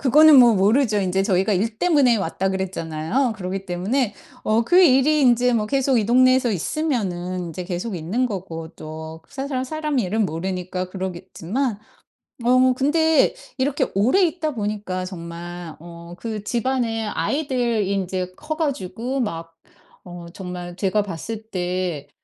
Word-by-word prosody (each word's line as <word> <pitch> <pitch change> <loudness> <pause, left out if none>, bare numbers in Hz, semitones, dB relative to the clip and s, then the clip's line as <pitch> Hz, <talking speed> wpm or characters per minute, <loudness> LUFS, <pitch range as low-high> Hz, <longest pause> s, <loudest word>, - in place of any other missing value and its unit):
그거는 295 +2 +7
뭐 250 - +10
뭐 - - +2
모르죠. 215 +2 +3
인제 190 0 +1
저희가 195 +1 +1
"일 215 +3 -1
때문에 285 -9 +4
왔다." 190 0 -1
그랬잖아요. 190 - -1
그러기 190 0 -4
때문에 205 +6 -1 0.3
어 220 +2 +3
그 360 +7 +5
일이 290 +1 +5
인제 245 -1 +4
뭐 210 -2 +1
계속 270 -1 +2
이 215 - +1
동네에서 255 0 +4
있으면은 190 - -2
인제 170 +2 -6
계속 185 +4 -4
있는 195 +11 -1
거고 170 -7 -6
또 160 +1 -8
그 - - -27
사람 270 -1 -3
사람 305 0 -2
일은 215 0 +1
모르니까 180 +2 -4
그러겠지만. 190 +5 -3 0.7
어 255 +1 +5
근데 320 - +3 0.2
이렇게 270 +1 +1
오래 250 - +3
있다 320 -4 0
보니까 205 -4 -3
정말 175 -1 -7
어 170 0 -11
그 220 -1 -5
집안의 235 -2 -1
아이들이 245 -10 -1
인제 185 -1 -2
커 310 0 -5
가지고 260 - -2
막 165 -7 -3 0.6
어 175 -1 -9
정말 180 -2 -7
제가 195 +2 +1
봤을 205 +4 -6
때 180 -5 -2
210 Hz, 300 characters per minute, -22 LUFS, 180-255 Hz, 0.7 s, 뭐